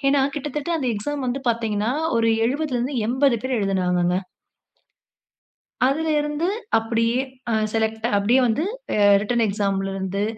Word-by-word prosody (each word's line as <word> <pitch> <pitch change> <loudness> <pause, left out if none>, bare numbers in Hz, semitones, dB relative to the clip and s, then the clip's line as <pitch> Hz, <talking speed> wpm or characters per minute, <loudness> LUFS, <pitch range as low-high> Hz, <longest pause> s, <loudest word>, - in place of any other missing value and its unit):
ஏன்னா, 275 0 +3 0.2
கிட்டத்தட்ட 295 +1 -4
அந்த 265 - -2
எக்ஸாம் 275 +7 -3
வந்து 265 +3 -2
பார்த்தீங்கன்னா, 225 -1 -1 0.3
ஒரு 230 0 +2 0.2
70 285 +3 -2
ல 245 - +1
இருந்து 255 +4 -2
80 260 0 +3
பேர் 260 0 -1
எழுதுனாங்கங்க. 180 -3 +1 1.7
அதில 315 +4 0
இருந்து 295 +3 -1 0.3
அப்பிடியே 230 +2 0 0.3
அ - - +1 0.2
செலக்ட் 220 0 -1
அப்பிடியே 210 +6 +3
வந்து 230 +7 0 0.3
அ - - 0 0.2
ரிட்டர்ன் 235 +3 +1
எக்ஸாம் 200 -1 0
ல - - -3
இருந்து 195 +1 -2
230 Hz, 145 wpm, -22 LUFS, 205-275 Hz, 1.7 s, ஏன்னா